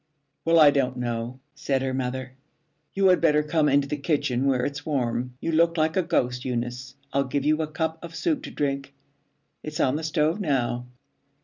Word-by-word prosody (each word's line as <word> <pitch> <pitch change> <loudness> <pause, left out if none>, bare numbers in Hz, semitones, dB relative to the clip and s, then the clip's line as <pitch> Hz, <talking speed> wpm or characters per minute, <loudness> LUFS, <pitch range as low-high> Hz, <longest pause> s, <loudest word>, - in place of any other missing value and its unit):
'Well, 165 0 +4
I 150 -2 +8
don't 130 -3 0
know,' 120 +1 -3
said 135 -1 -1
her 130 -1 -1
mother. 130 0 -3 0.6
'You 195 -1 +4
had 180 - +4
better 150 -2 +4
come 150 0 +2
into 140 0 +3
the 150 - -2
kitchen 140 -4 0
where 130 -2 +2
it's 145 0 -4
warm. 125 -4 -2
You 165 - -2
look 165 +1 +3
like 160 0 +1
a 185 - +3
ghost, 125 -8 0
Eunice. 125 +1 -4 0.2
I'll 140 0 +2
give 140 +1 -2
you 155 +1 +3
a 155 - -1
cup 160 +1 -3
of 165 -1 -8
soup 310 - 0
to - - -6
drink. 140 -1 -3 0.7
It's 155 +1 -6
on 135 0 +2
the 160 - -5
stove 155 +3 +1
now.' 125 -6 -1
140 Hz, 195 wpm, -25 LUFS, 130-160 Hz, 0.7 s, I